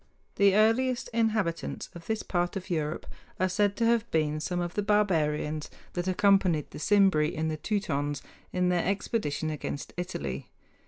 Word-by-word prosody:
The 200 Hz, -1 st, +5 dB
earliest 240 Hz, +4 st, +3 dB
inhabitants 220 Hz, -7 st, -1 dB
of 170 Hz, -1 st, -11 dB
this 220 Hz, -1 st, -1 dB
part 175 Hz, -1 st, -1 dB
of 185 Hz, -1 st, -5 dB
Europe 155 Hz, -1 st, -2 dB, 0.3 s
are 185 Hz, -, +3 dB
said 200 Hz, +2 st, +1 dB
to 230 Hz, -, +1 dB
have 235 Hz, 0 st, +2 dB
been 155 Hz, -1 st, +1 dB
some 175 Hz, +3 st, -2 dB
of 175 Hz, -1 st, -2 dB
the 205 Hz, -, 0 dB
barbarians 155 Hz, -7 st, +1 dB, 0.2 s
that 175 Hz, +1 st, -2 dB
accompanied 185 Hz, -5 st, +3 dB
the -, -, -8 dB
Cimbri 190 Hz, -5 st, +3 dB
and 160 Hz, +1 st, -1 dB
Teutons 145 Hz, -9 st, -1 dB, 0.3 s
in 180 Hz, 0 st, +1 dB
their 175 Hz, -1 st, +2 dB
expedition 180 Hz, -6 st, -1 dB
against 145 Hz, -1 st, -5 dB
Italy. 70 Hz, -, -4 dB
180 Hz, 155 wpm, -28 LUFS, 155-205 Hz, 0.3 s, The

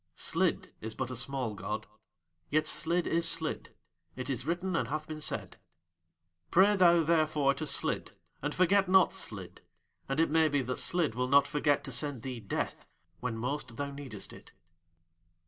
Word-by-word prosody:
"Slid -, -, 0 dB
is 110 Hz, 0 st, -5 dB
but 130 Hz, -1 st, -3 dB
a -, -, -4 dB
small 130 Hz, -2 st, -2 dB
god. 105 Hz, +1 st, -4 dB, 0.6 s
Yet 155 Hz, +1 st, +2 dB
Slid 170 Hz, +2 st, +1 dB
is 165 Hz, 0 st, +1 dB
Slid 160 Hz, -1 st, -3 dB, 0.4 s
it 130 Hz, +2 st, -3 dB
is 125 Hz, +1 st, -3 dB
written 175 Hz, +2 st, -1 dB
and -, -, 0 dB
hath 155 Hz, +1 st, -3 dB
been 155 Hz, -1 st, -7 dB
said. 95 Hz, -10 st, -2 dB, 0.9 s
"Pray, 195 Hz, +4 st, +5 dB
thou, 175 Hz, -3 st, +6 dB
therefore, 155 Hz, -3 st, +3 dB
to 155 Hz, +3 st, -4 dB
Slid, 140 Hz, -, -1 dB, 0.3 s
and 145 Hz, +1 st, -2 dB
forget 190 Hz, +1 st, +4 dB
not 190 Hz, -1 st, +5 dB
Slid, 95 Hz, -, -5 dB, 0.5 s
and 135 Hz, +3 st, 0 dB
it 165 Hz, -2 st, +3 dB
may 160 Hz, 0 st, +5 dB
be 145 Hz, -2 st, +1 dB
that 125 Hz, +1 st, -3 dB
Slid 170 Hz, -8 st, +1 dB
will 125 Hz, +2 st, -1 dB
not 140 Hz, +1 st, +6 dB
forget 145 Hz, -1 st, +1 dB
to 135 Hz, -, -5 dB
send 135 Hz, -2 st, -3 dB
thee 130 Hz, -3 st, -4 dB
Death 100 Hz, -, -4 dB, 0.3 s
when 120 Hz, -2 st, -3 dB
most 125 Hz, 0 st, -3 dB
thou 140 Hz, 0 st, -3 dB
needest 135 Hz, -8 st, -8 dB
it." -, -, -14 dB
145 Hz, 170 wpm, -31 LUFS, 125-165 Hz, 0.9 s, thou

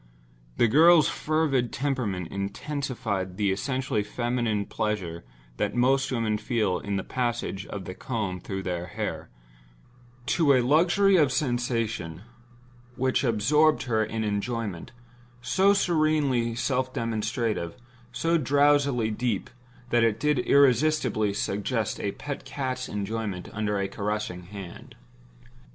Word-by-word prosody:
The 120 Hz, -, +4 dB
girl's 160 Hz, +5 st, +6 dB
fervid 150 Hz, -6 st, 0 dB
temperament 120 Hz, -, -2 dB
intensified 100 Hz, -2 st, -3 dB
the 100 Hz, -2 st, +1 dB
essentially 130 Hz, +2 st, -1 dB
feminine 120 Hz, -1 st, -1 dB
pleasure 95 Hz, -7 st, -3 dB, 0.3 s
that 105 Hz, 0 st, -1 dB
most 135 Hz, +2 st, +2 dB
women 110 Hz, -4 st, 0 dB
feel 105 Hz, -5 st, 0 dB
in 100 Hz, -1 st, -3 dB
the 100 Hz, -, -1 dB
passage 120 Hz, -5 st, -2 dB
of 100 Hz, -2 st, -6 dB
the 95 Hz, -, -6 dB
comb 105 Hz, -4 st, -3 dB
through 95 Hz, +2 st, -5 dB
their 90 Hz, -2 st, -3 dB
hair, -, -, -4 dB, 1.0 s
to 150 Hz, 0 st, +3 dB
a 130 Hz, -, +4 dB
luxury 180 Hz, +7 st, +4 dB
of 150 Hz, -5 st, +4 dB
sensation 115 Hz, -, -1 dB, 0.7 s
which 130 Hz, +2 st, +1 dB
absorbed 140 Hz, +7 st, +3 dB
her 110 Hz, -3 st, +1 dB
in 110 Hz, 0 st, -3 dB
enjoyment, 105 Hz, -3 st, -3 dB, 0.5 s
so 190 Hz, +11 st, +3 dB
serenely 155 Hz, -10 st, +2 dB
self 130 Hz, +2 st, -1 dB
demonstrative, 115 Hz, -6 st, -2 dB, 0.4 s
so 165 Hz, +5 st, +1 dB
drowsily 140 Hz, -4 st, +3 dB
deep 110 Hz, -2 st, -2 dB, 0.4 s
that 120 Hz, -1 st, +4 dB
it 115 Hz, -1 st, +2 dB
did 150 Hz, -1 st, +2 dB
irresistibly 130 Hz, -4 st, +3 dB
suggest 105 Hz, +3 st, -2 dB
a 100 Hz, -, -2 dB
pet 145 Hz, -1 st, -6 dB
cat's 130 Hz, -2 st, -4 dB
enjoyment 105 Hz, -2 st, -4 dB
under 105 Hz, -1 st, -1 dB
a 100 Hz, -, 0 dB
caressing 100 Hz, -3 st, -3 dB
hand. 95 Hz, -2 st, -10 dB
115 Hz, 120 wpm, -26 LUFS, 105-135 Hz, 1.0 s, girl's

